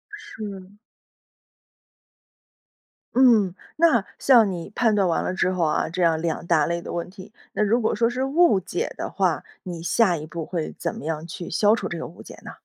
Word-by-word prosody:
是。 200 - -9 2.4
嗯， 220 -8 +5 0.2
那 290 -11 +4
像 235 -7 +5
你 170 -2 -6
判 230 -3 +3
断 200 -2 +2
完 170 - 0
了 - - -2
之 185 0 +1
后 180 -2 0
啊， 155 0 0
这 180 +2 -3
样 160 -1 +2
两 170 0 -2
大 160 -3 +3
类 170 0 -2
的 - - -7
问 170 +1 -3
题。 190 +2 -12 0.2
那 - - +1
如 230 +4 +2
果 220 - 0
说 230 0 +2
是 255 +2 -2
误 275 - +4
解 180 -1 -4
的 - - -4
话， 180 -7 0 0.2
你 175 -3 -6
下 180 -1 +2
一 150 - -7
步 165 -1 -5
会 165 -2 -4
怎 - - -3
么 - - -8
样 160 0 -3
去 170 +1 -7
消 205 +5 +3
除 195 -5 -4
这 175 - -5
个 165 - -5
误 170 - -13
解 - - -12
呢？ - - -8
185 Hz, 215 characters per minute, -24 LUFS, 170-220 Hz, 2.4 s, 嗯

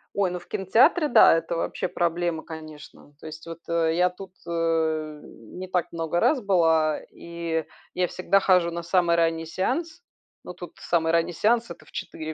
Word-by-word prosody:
Ой, 200 -2 +1
ну 180 - -4
в - - -18
кинотеатре, 260 - +3
да, 165 - +6
это 165 +1 -3
вообще - - -2
проблема, 170 -1 -1
конечно. 155 -2 -11
То - - -10
есть 160 +1 -10
вот, 165 0 -8
э, 165 -1 +1
я 180 +1 +3
тут, 185 +1 -12
э, 160 -2 -1
не 180 +12 -10
так 180 -2 -1
много 165 +1 -1
раз 255 +2 +2
была, 165 -5 +2
и 170 -1 -4 0.3
я 180 -1 0
всегда 195 +3 +1
хожу 180 -3 +3
на 170 0 -5
самый 170 -1 +2
ранний 165 -1 +1
сеанс. 320 - -3 0.4
Ну 180 - -8
тут 175 -1 -10
самый 165 -1 +1
ранний 170 +1 +2
сеанс 230 +3 +1
это - - -11
в - - -20
4 160 0 -6
170 Hz, 180 wpm, -25 LUFS, 160-185 Hz, 0.4 s, да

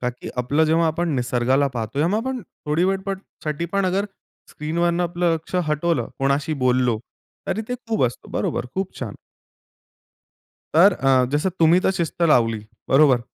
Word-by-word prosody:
का 125 - -1
की 125 - -10
आपलं 145 +6 +2
जेव्हा 165 +1 +3
आपण 170 +2 0
निसर्गाला 125 +3 +1
पाहतो 115 +3 -4
या 155 - +3
मग 200 - +1
आपण 260 -1 -2 0.3
थोडी 155 +4 +2
वेळपणसाठी 190 -5 -3
पण 200 -1 +1
अगर 195 +3 0 0.4
स्क्रीनवरनं 170 +3 0
आपलं 175 0 0
लक्ष 160 +3 -8
हटवलं, 150 -5 0
कोणाशी 140 +3 0
बोललो, 125 -2 +2 0.5
तरी 220 - -1
ते 250 - -1
खूप 220 -11 +2
असतं. 125 0 -4
बरोबर. - - -1
खूप 190 0 -3
छान. 115 -6 -5 1.6
तर 185 +6 +7
अ, 135 -5 +3
जसं 150 +6 +1
तुम्ही 165 +2 +5
तर - - +2
शिस्त 170 0 -2
लावली, 115 -9 +3 0.2
बरोबर? 135 -3 +5
155 Hz, 155 wpm, -22 LUFS, 130-175 Hz, 1.6 s, तर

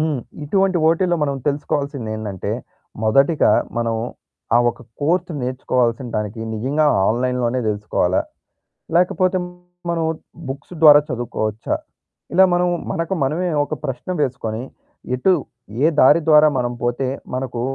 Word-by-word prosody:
హ్మ్. 155 -4 0 0.2
ఇటువంటి 190 +3 +2
ఓటీలో 175 +1 +2
మనం 140 -2 0
తెలుసుకోవాల్సిందేందంటే 125 - -3 0.5
మొదటిగా 135 +4 +4 0.3
మనం 115 -1 0 0.6
ఆ - - +6
ఒక - - -15 0.2
కోర్స్ 175 +4 +1
నేర్చుకోవాల్సిన 125 -1 0
దానికి 105 +1 -3
నిజంగా 140 +8 +1 0.2
ఆన్లైన్‌లోనే 125 +1 0
తెలుసుకోవాలా? 105 -3 0 0.8
లేకపోతే 185 +1 +2 0.5
మనం 170 -1 0 0.5
బుక్స్ 140 +6 -7
ద్వారా 150 -2 +9
చదువుకోవచ్చా? 115 -3 -2 0.6
ఇలా 190 - +6
మనం 175 0 +2 0.2
మనకు 165 +2 -2
మనమే 165 +7 0
ఒక - - -5
ప్రశ్న 135 +6 -5
వేసుకొని 120 -4 -2 0.5
ఎటు 185 +9 +3 0.5
ఏ - - +6
దారి 150 +6 +6
ద్వారా 155 0 +7
మనం 120 -1 0
పోతే 120 +2 0 0.3
మనకు 130 -2 -3
135 Hz, 115 wpm, -20 LUFS, 120-160 Hz, 0.8 s, ద్వారా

